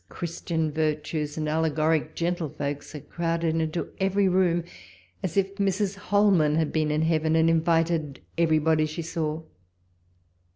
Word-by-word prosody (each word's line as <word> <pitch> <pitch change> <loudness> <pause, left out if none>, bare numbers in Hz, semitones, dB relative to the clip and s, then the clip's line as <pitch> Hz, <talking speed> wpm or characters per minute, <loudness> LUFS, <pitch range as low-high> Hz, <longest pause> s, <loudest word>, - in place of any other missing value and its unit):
Christian 165 -2 -3
virtues, 150 0 -2
and 155 -1 -2
allegoric 155 0 +1
gentlefolks, 155 -4 -3
are 150 - -6
crowded 165 0 -1
into 160 +1 -2
every 195 +1 +2
room, 180 -2 +2 0.6
as 185 0 -3
if 195 0 0
Mrs. 200 0 0
Holman 200 -7 +3
had 160 -2 0
been 155 -1 +1
in 150 +1 +1
heaven 160 -1 +1
and 165 0 +4
invited 165 -3 +1 0.2
everybody 160 -1 +2
she 155 +2 -5
saw. 160 -1 -3
160 Hz, 130 wpm, -26 LUFS, 155-175 Hz, 0.6 s, and